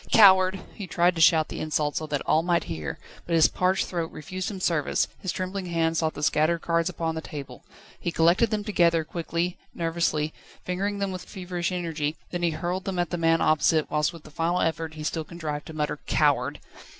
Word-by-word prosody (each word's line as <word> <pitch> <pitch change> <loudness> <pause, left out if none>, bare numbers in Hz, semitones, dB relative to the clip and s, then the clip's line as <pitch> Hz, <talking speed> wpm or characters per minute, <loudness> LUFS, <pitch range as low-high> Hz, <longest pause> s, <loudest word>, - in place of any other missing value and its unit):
"Coward!" 190 -3 +7
He 200 -4 -7
tried 175 +2 +3
to 165 - -2
shout 160 -1 +5
the - - -5
insult 150 -1 -1
so 155 - -2
that 145 -2 -2
all 155 - +3
might 170 0 +1
hear, 80 -3 -5 0.3
but 170 - +1
his 160 - +7
parched 185 +1 +1
throat 170 -2 -3
refused 185 +4 -5
him 200 -3 -6
service, 165 -5 +1
his 185 - -2
trembling 185 0 -4
hand 165 -1 +1
sought 160 -1 0
the 145 - -5
scattered 155 +3 +2
cards 170 +1 +1
upon 165 -2 -2
the 160 - -4
table, 145 -3 -8 0.4
he 170 - -2
collected 170 +8 +4
them 210 -1 -1
together, 170 -6 +3
quickly, 170 +2 -3 0.2
nervously, 165 -2 0 0.3
fingering 200 +3 -1
them 200 -1 -1
with 185 -1 -6
feverish 180 -1 -3
energy, 165 -4 -2 0.2
then 175 - -3
he 170 - +2
hurled 175 +3 -3
them 190 -2 -3
at 175 -1 0
the 175 - -1
man 165 0 +3
opposite, 155 0 +3
whilst 150 +1 +1
with 165 -3 -13
a 155 - -12
final 165 +4 0
effort 160 -1 -1
he 155 - -6
still 160 +1 -2
contrived 155 -3 -5
to 160 - -8
mutter: 150 -1 -2
"Coward!" - - +2
170 Hz, 210 wpm, -26 LUFS, 155-180 Hz, 0.4 s, Coward